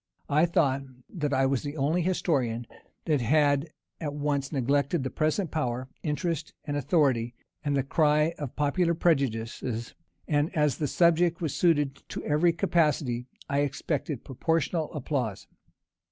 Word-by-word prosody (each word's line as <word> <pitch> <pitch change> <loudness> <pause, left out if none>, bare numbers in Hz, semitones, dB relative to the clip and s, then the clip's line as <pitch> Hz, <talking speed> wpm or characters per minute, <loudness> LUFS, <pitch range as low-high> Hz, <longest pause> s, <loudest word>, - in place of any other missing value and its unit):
I 155 +4 +4
thought 140 -5 +2 0.3
that 150 -5 -2
I 135 -1 +3
was 135 -2 +1
the 145 +1 -5
only 155 +6 +1
historian 135 -10 0 0.4
that 150 -5 +2
had 145 +4 +3 0.3
at 145 -2 -4
once 145 -2 -1
neglected 140 +1 +1
present 155 +2 0
power, 130 -4 -2
interest, 165 +1 -2
and 145 - -2
authority, 135 -5 +1 0.3
and 145 -2 0
the 135 - +1
cry 150 +3 +2
of 145 -5 -5
popular 170 +4 +1
prejudices; 120 -7 0 0.3
and 145 +1 +2
as 150 -2 +2
the 150 - 0
subject 170 +2 +3
was 160 -5 -2
suited 145 -6 +2
to - - -5
every 155 +4 +3
capacity, 150 -7 +1 0.2
I 140 0 0
expected 145 -1 -2
proportional 160 +3 -1
applause. 130 -8 -3
145 Hz, 140 wpm, -28 LUFS, 135-160 Hz, 0.4 s, I